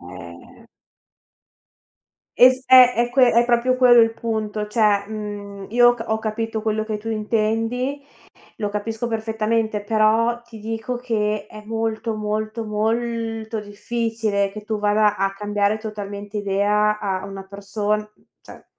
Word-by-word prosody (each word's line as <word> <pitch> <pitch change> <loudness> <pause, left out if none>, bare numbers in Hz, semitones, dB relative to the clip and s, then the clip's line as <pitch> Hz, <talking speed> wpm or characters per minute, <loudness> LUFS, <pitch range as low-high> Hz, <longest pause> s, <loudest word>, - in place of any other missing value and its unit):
Eh. 85 -1 -12 1.7
Es 255 +1 +6
eh, 250 -1 +9
è 240 +1 +1
que 250 -1 +4
è 235 +1 +4
proprio 245 +1 +2
quello 245 -2 +7
il 225 0 +3
punto, 215 -2 -3
cioè 210 -2 +2
mhmm, 205 -2 -7
io 240 +1 +6
ho 240 - +4
c 225 -1 -7
ho 220 0 0
capito 220 0 -3
quello 215 -1 -1
che 215 -1 -3
tu 210 +2 -8
intendi, 225 +5 -1 0.6
lo 210 -2 -2
capisco 220 +3 -3
perfettamente, 220 -1 -1
però 225 +2 +2
ti 235 -2 -13
dico 225 +3 -4
che 215 -4 -1
è 215 0 -11
molto, 225 0 -2
molto, 215 +1 -3
molto 225 +1 -2
difficile 210 -1 -2
che 210 0 -9
tu 215 -1 -3
vada 210 0 +2
a 195 0 -1
cambiare 205 +1 0
totalmente 205 -1 -7
idea 210 +1 +1
a 190 -2 -2
una 195 -1 -8
person 205 +2 -2 0.4
cioè - - -14
215 Hz, 140 wpm, -22 LUFS, 210-230 Hz, 1.7 s, eh